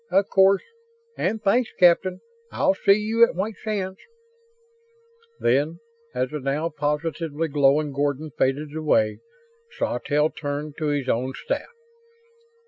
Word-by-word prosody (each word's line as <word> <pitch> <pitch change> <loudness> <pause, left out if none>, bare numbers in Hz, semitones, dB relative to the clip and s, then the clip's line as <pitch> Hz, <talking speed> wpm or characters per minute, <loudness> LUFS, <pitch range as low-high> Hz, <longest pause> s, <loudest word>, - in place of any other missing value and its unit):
"Of 195 0 +2
course. 195 0 +4 0.5
And 215 +4 -2
thanks, 235 +4 +2
Captain. 180 +1 +4 0.3
I'll - - +2
see 195 +1 +4
you 220 +2 +2
at 235 - +4
White 200 +3 -3
Sands." 195 -3 -3 1.4
Then, 145 +7 +1 0.4
as 125 0 -1
the 150 - -3
now 145 +4 -1
positively 150 +1 -2
glowing 145 +1 +3
Gordon 145 +2 -1
faded 145 +4 -1
away, 130 -9 +1 0.6
Sawtelle 150 +1 0
turned 145 0 -5
to 155 - -2
his 145 -3 -1
own 130 +2 0
staff. 475 - -4
155 Hz, 125 wpm, -24 LUFS, 145-190 Hz, 1.4 s, course